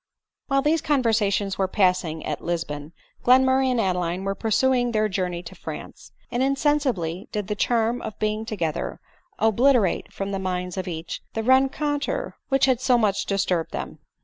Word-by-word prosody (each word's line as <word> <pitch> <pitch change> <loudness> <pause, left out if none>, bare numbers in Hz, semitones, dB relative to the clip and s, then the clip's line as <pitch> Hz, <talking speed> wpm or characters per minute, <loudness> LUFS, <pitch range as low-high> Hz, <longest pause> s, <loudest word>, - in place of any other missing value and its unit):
While 275 -1 +2
these 310 +1 +2
conversations 210 -8 +1
were 190 - +2
passing 180 -5 +1
at 150 - -3
Lisbon, 160 -3 -3 0.3
Glenmurray 260 +1 +5
and 250 -2 +1
Adeline 180 -2 0
were 195 0 -1
pursuing 245 +3 +1
their 215 0 +2
journey 180 -3 -2
to 165 - -9
France; - - -9 0.2
and 240 - 0
insensibly 265 - 0
did 210 -2 -2
the 210 - -1
charm 230 +2 +1
of 220 - -6
being 215 0 -1
together 180 -8 -3 0.4
obliterate 225 -1 +3
from 195 0 -4
the 195 - -2
minds 180 -1 -3
of 185 -1 -4
each 165 -1 -5
the 225 - -1
rencontre 270 +3 +1 0.2
which 270 -1 +4
had 260 -2 +2
so 255 -2 +4
much 200 -3 +1
disturbed 185 -4 0
them. - - -5
215 Hz, 160 wpm, -24 LUFS, 185-255 Hz, 0.4 s, Glenmurray